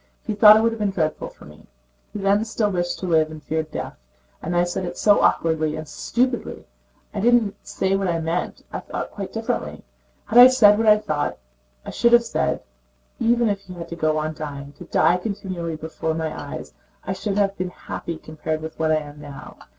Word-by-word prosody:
He 220 Hz, -, -1 dB
thought 210 Hz, +1 st, +8 dB
it -, -, +3 dB
would 230 Hz, 0 st, 0 dB
be 210 Hz, -, 0 dB
dreadful 165 Hz, -6 st, -1 dB
for -, -, -16 dB
me. 75 Hz, +1 st, -16 dB, 0.4 s
He -, -, -6 dB
then 200 Hz, +1 st, +2 dB
still 220 Hz, -2 st, -1 dB
wished 175 Hz, -1 st, -1 dB
to -, -, -5 dB
live 160 Hz, -3 st, +3 dB
and 155 Hz, -1 st, -10 dB
feared 160 Hz, 0 st, -2 dB
death. -, -, -6 dB, 0.4 s
And 175 Hz, +2 st, -2 dB
I 175 Hz, -, +4 dB
said 175 Hz, +2 st, -3 dB
it 175 Hz, 0 st, -5 dB
so 205 Hz, -1 st, +4 dB
awkwardly 160 Hz, -2 st, +2 dB
and 155 Hz, 0 st, -6 dB
stupidly! 245 Hz, -, -2 dB, 0.5 s
I 210 Hz, -, -3 dB
did 240 Hz, +4 st, +5 dB
not 220 Hz, -4 st, +1 dB
say 190 Hz, 0 st, -1 dB
what 195 Hz, -1 st, 0 dB
I 170 Hz, -2 st, 0 dB
meant. 165 Hz, +2 st, -3 dB
I -, -, -2 dB
thought -, -, -6 dB
quite -, -, -6 dB
differently. -, -, -3 dB, 0.4 s
Had 235 Hz, -, +4 dB
I 250 Hz, -, +12 dB
said 220 Hz, -5 st, +5 dB
what 225 Hz, -, +1 dB
I 210 Hz, 0 st, +8 dB
thought, 155 Hz, -8 st, -2 dB, 0.5 s
I -, -, -6 dB
should 235 Hz, 0 st, +2 dB
have 240 Hz, 0 st, +7 dB
said: -, -, -1 dB, 0.6 s
even 235 Hz, 0 st, +3 dB
if 200 Hz, -2 st, 0 dB
he 190 Hz, -2 st, -11 dB
had 170 Hz, -1 st, -8 dB
to 170 Hz, -, -5 dB
go 155 Hz, -2 st, +1 dB
on 155 Hz, +1 st, -2 dB
dying, 145 Hz, -2 st, -7 dB
to 180 Hz, -, -9 dB
die 175 Hz, +1 st, +3 dB
continually 180 Hz, -4 st, -4 dB
before 160 Hz, 0 st, -4 dB
my 160 Hz, -1 st, -2 dB
eyes, -, -, -7 dB, 0.3 s
I -, -, -2 dB
should 205 Hz, -2 st, -3 dB
have 200 Hz, -1 st, +2 dB
been 185 Hz, -1 st, -3 dB
happy 170 Hz, -2 st, -6 dB
compared 155 Hz, 0 st, -4 dB
with 160 Hz, 0 st, -8 dB
what 160 Hz, -1 st, +2 dB
I -, -, +4 dB
am 145 Hz, -1 st, -8 dB
now. 145 Hz, -2 st, -10 dB
175 Hz, 215 wpm, -23 LUFS, 155-210 Hz, 0.6 s, I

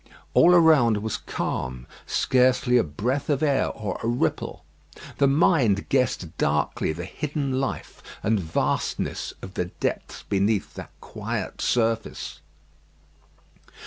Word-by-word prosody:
All 180 Hz, +1 st, +6 dB
around 150 Hz, -10 st, +5 dB
was 110 Hz, -, -2 dB
calm. 65 Hz, 0 st, -4 dB, 0.2 s
Scarcely 125 Hz, -1 st, +2 dB
a -, -, +3 dB
breath 120 Hz, -, -2 dB
of 145 Hz, 0 st, +1 dB
air 140 Hz, -3 st, +2 dB
or 105 Hz, -2 st, -4 dB
a -, -, -1 dB
ripple. 120 Hz, +1 st, -1 dB, 0.6 s
The 140 Hz, -, +5 dB
mind 135 Hz, -, +3 dB
guessed 115 Hz, -10 st, 0 dB
darkly -, -, 0 dB
the 85 Hz, +3 st, -5 dB
hidden 140 Hz, +2 st, -2 dB
life 135 Hz, -, -5 dB, 0.2 s
and 110 Hz, +1 st, +2 dB
vastness 80 Hz, -3 st, -2 dB
of 95 Hz, -, -8 dB
the 90 Hz, -, -1 dB
depths 90 Hz, -, -4 dB
beneath 100 Hz, +1 st, 0 dB
that -, -, -8 dB
quiet -, -, -5 dB
surface. 115 Hz, -2 st, -1 dB
120 Hz, 120 wpm, -25 LUFS, 100-135 Hz, 0.6 s, All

